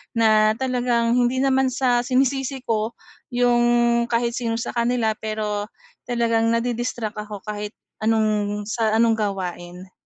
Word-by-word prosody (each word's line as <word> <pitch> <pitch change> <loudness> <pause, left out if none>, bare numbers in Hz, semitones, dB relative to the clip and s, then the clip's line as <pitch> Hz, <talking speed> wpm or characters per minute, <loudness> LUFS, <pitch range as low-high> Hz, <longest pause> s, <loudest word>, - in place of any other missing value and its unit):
na 215 -1 +4
talagang 245 -2 0
hindi 250 +2 +2
naman 265 -1 +3
sa 250 -1 +1
sinisisi 265 +1 0
ko 225 0 -1 0.4
yung, 240 -1 +3
kahit 235 0 0
sino 230 -2 -2
sa 235 - -3
kanila, 235 -2 +1
pero 210 -1 -3 0.4
talagang 230 -2 +1
nadi-distract 230 -1 -1
ako 210 -2 -7
kahit 210 0 -5 0.2
anong 215 -2 0
sa 220 0 0
anong 230 0 +4
gawain. 185 -2 -4
230 Hz, 125 wpm, -22 LUFS, 215-245 Hz, 0.4 s, na